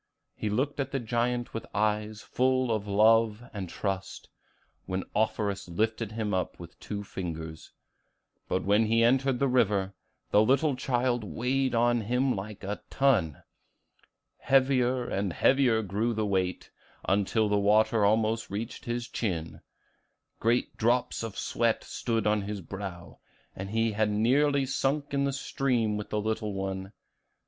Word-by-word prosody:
He 105 - -3
looked 135 +8 -1
at 135 -1 -1
the 135 - -1
giant 120 +1 -1
with 115 - -5
eyes 105 0 0
full 130 -1 +1
of 105 -2 -1
love 110 +2 +4
and 95 -4 -5
trust, 95 0 -4 0.6
and 95 0 -2
Offerus 100 -3 -1
lifted 110 +4 -1
him 110 -2 -2
up 90 -1 -2
with 85 -1 -11
two 105 -1 -5
fingers; 80 -4 -6 0.8
but 95 - -1
when 105 +3 +3
he 115 +1 +3
entered 130 +2 +3
the 140 - +2
river, 105 -6 +2 0.4
the 105 - +6
little 135 +5 +3
child 125 -2 0
weighed 130 +5 -1
on 120 0 +3
him 125 +4 +1
like 100 +1 -7
a 100 +2 -4
ton. 110 - +1 1.0
Heavier 130 -2 +2
and 100 -2 -1
heavier 125 - +3
grew 110 +4 -1
the 110 0 0
weight, 95 -3 -1 0.4
until 105 +3 +2
the 105 0 +2
water 105 +2 +3
almost 110 +2 +2
reached 110 +4 -5
his 120 0 -3
chin; 85 -10 -3 0.8
great 120 +2 +1
drops 120 +2 +1
of 115 -3 -6
sweat 115 -1 0
stood 115 -3 -2
on 105 0 +2
his 100 0 -5
brow, 95 -1 -8 0.4
and 95 +1 -6
he 115 +1 +1
had 105 0 +1
nearly 135 +7 +3
sunk 140 +2 -1
in 140 0 +2
the 140 - 0
stream 125 -5 0
with 105 0 -5
the 105 - -1
little 105 -1 -2
one. 95 0 -4
110 Hz, 150 wpm, -28 LUFS, 100-125 Hz, 1.0 s, the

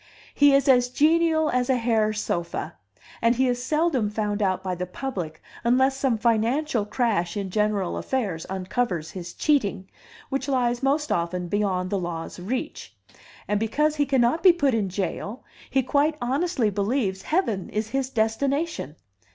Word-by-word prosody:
He 285 -1 +5
is 275 0 +2
as 250 -2 +5
genial 315 +2 +3
as 250 0 0
a 260 - +4
hair 225 -3 +1
sofa; 175 -5 -3 0.5
and 230 +1 +3
he 260 +2 +2
is 245 0 -1
seldom 300 -7 +1
found 210 0 -2
out 185 -2 0
by 185 -1 -2
the 180 +1 -4
public 180 - -5 0.2
unless 260 +3 +3
some 265 -4 +1
financial 230 +2 +1
crash 210 -6 0
in 195 -2 -3
general 210 -3 0
affairs 200 -11 -2
uncovers 190 -3 -2
his 175 -2 -7
cheating, 205 -11 0 0.4
which 270 +1 -2
lies 245 -3 +1
most 290 +3 +1
often 175 +1 -1
beyond 185 -3 0
the 200 - 0
law's 170 -1 -5
reach; 250 - -5 0.5
and 210 0 +1
because 300 +8 +1
he 290 -1 +2
cannot 265 +3 +2
be 370 - +8
put 285 -7 +1
in 210 -4 0
jail, 195 +5 -4 0.3
he 265 -1 +2
quite 295 +4 +1
honestly 260 - 0
believes 200 -1 -1
heaven 225 - -1
is 215 +1 -2
his 270 +1 -1
destination. 265 - -1
235 Hz, 160 wpm, -25 LUFS, 195-270 Hz, 0.5 s, be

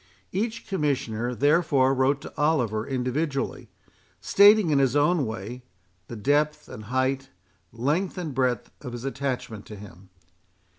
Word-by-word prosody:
Each 220 +4 -2
Commissioner, 135 - -1
therefore, 145 -1 +3
wrote 135 +1 +1
to - - -10
Oliver 125 -8 +1
individually, 135 +2 -2 0.5
stating, 205 -3 +5
in 140 - +3
his 135 -1 +2
own 145 -1 +3
way, 110 +3 -6 0.5
the 120 - -7
depth 145 +7 0
and 110 - -9
height, 130 +3 -1 0.4
length 150 +12 -1
and 165 -5 -4
breadth, 125 -2 0
of 125 -3 -6
his 120 +1 -6
attachment 130 -6 -4
to 105 - -9
him. 95 -2 -13
135 Hz, 135 wpm, -25 LUFS, 120-150 Hz, 0.5 s, stating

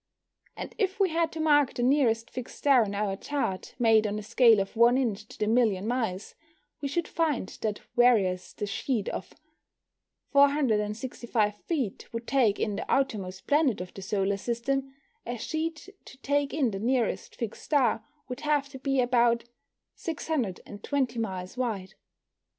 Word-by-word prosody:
And - - -6
if 390 -2 0
we 390 -2 +4
had 330 0 +1
to 320 - -6
mark 290 -3 +3
the 240 - -1
nearest 245 -4 +2
fixed 255 -1 -7
star 275 -5 +5
on 205 -1 -4
our 200 -1 -1
chart 195 -5 -3
made 225 -3 +4
on 210 0 -2
a 215 - -5
scale 225 0 +5
of 195 +3 -3
1 235 +2 +5
inch 220 -5 -1
to - - -13
the 210 - 0
million 215 -4 +2
miles, 225 -5 -2 0.5
we 285 - -1
should 330 +4 -1
find 310 - 0
that 210 -2 -2
whereas 200 -7 +3
a - - -1
sheet 210 +2 -2
of - - -6 1.0
465 235 -5 +2
feet 260 - -3
would 230 0 -5
take 240 -7 +2
in 205 -2 -1
the - - -4
outermost 195 -8 -1
planet 290 -5 +2
of 180 0 -7
the 195 - -9
solar 195 0 0
system, 265 +5 -2 0.3
a 240 +1 -4
sheet 315 - -3 0.2
to 265 - -13
take 285 0 +1
in 275 -6 +1
the 195 - -4
nearest 240 +1 0
fixed 230 -3 -5
star 285 -4 +2 0.2
would 250 0 -6
have 295 -2 0
to 270 -2 -10
be 270 0 0
about 240 -1 +3 0.5
620 255 - -3
miles 190 -1 -4
wide. 215 -7 -2
240 Hz, 160 wpm, -28 LUFS, 210-275 Hz, 1.0 s, star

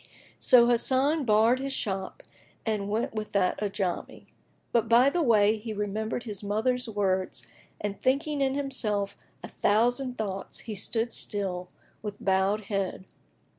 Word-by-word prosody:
So 240 -2 +7
Hasan 265 +5 +3
barred 225 +3 +4
his 275 0 -3
shop 195 -6 -4 0.4
and 210 -3 -1
went 220 +3 -1
with 215 -1 -5
that 190 -3 +1
Ajamí; 195 -3 -3 0.5
but 230 -2 +1
by 245 +4 +6
the 345 - 0
way 220 -5 +4
he 220 0 -5
remembered 215 +3 -2
his 210 -3 -6
mother's 230 +4 0
words 190 -3 -1 0.3
and 205 -1 -4
thinking 280 +3 +1
in 270 0 +1
himself 210 -8 -1 0.3
a - - -5
thousand 245 +5 +1
thoughts 195 -3 -5
he 225 - -6
stood 225 +3 -1
still, 180 -3 -3 0.3
with 210 -1 -5
bowed 195 +2 +1
head. 195 -2 -3
215 Hz, 140 wpm, -28 LUFS, 200-245 Hz, 0.5 s, So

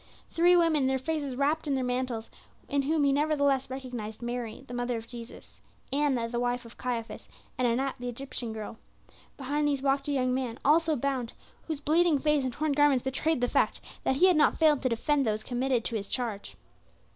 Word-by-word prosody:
Three 350 +2 +5
women, 315 -5 +3
their 265 0 +1
faces 285 -1 -3
wrapped 295 +4 0
in 280 - +1
their 260 - 0
mantles, 250 -2 -2 0.4
in 280 0 +1
whom 300 +2 +1
he 280 - +4
nevertheless 285 -2 +1
recognized 245 -5 -6
Mary, 240 0 -5
the 245 - -8
mother 245 0 -1
of 225 0 -8
Jesus, 235 -1 -11 0.3
Anna, 275 -5 +1
the 240 +1 -3
wife 245 0 -1
of 230 - -12
Caiaphas, 240 -2 -4 0.3
and 255 - +1
Anat 260 +4 0
the 245 0 -4
Egyptian 245 -1 -5
girl. 220 0 -7 0.6
Behind 290 +2 -1
these 280 -2 -1
walked 275 0 +1
a - - 0
young 255 -2 +1
man, 255 -3 -2
also 315 +2 +4
bound, 260 -3 -2 0.3
whose 315 -3 -3
bleeding 320 +1 +3
face 300 0 +2
and 255 -1 -2
torn 305 +3 -1
garments 285 -3 +3
betrayed 265 +2 0
the 245 - +2
fact - - +1 0.2
that 265 - +1
he 345 - +5
had 365 -2 +5
not 300 - +4
failed 305 -4 +4
to 255 - +1
defend 275 +5 +1
those 215 -2 -1
committed 250 -1 0
to 230 - -1
his 200 -2 -3
charge. 205 - -4
265 Hz, 200 wpm, -29 LUFS, 245-290 Hz, 0.6 s, Three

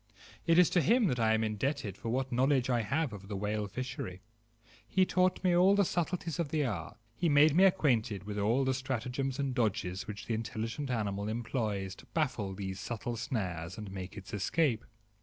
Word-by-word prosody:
It 165 0 +5
is 180 -2 +6
to 175 - +4
him 230 - +4
that 125 -3 -1
I 110 -1 +4
am 110 - +1
indebted 110 0 -2
for 115 - -5
what 130 +2 -1
knowledge 130 +1 +2
I 120 -1 +2
have 140 +4 -1
of 100 -1 -9
the 100 - -4
whale 105 +1 -1
fishery. 100 -5 -5 0.6
He 190 -1 +3
taught 185 0 +1
me 180 -2 +4
all 185 +3 +6
the 200 -1 +4
subtleties 175 -1 -2
of 165 -4 0
the 150 -1 +1
art; 100 -3 -4 0.2
he 170 +4 +1
made 145 +1 +6
me 190 +3 +7
acquainted 120 - +2
with 105 0 -4
all 115 +7 +2
the 130 - +2
stratagems 130 +1 -2
and 140 -2 -1
dodges 95 -6 -1
which 105 0 -6
the 115 - -2
intelligent 115 +5 -3
animal 100 -4 -1
employs 110 -4 -2
to - - -15
baffle 120 -11 0
these 95 -1 -5
subtle 120 +1 -4
snares 95 - -3
and 105 -3 -7
make 95 +1 -7
its 95 - -9
escape. 120 - +1
120 Hz, 195 wpm, -32 LUFS, 105-145 Hz, 0.6 s, me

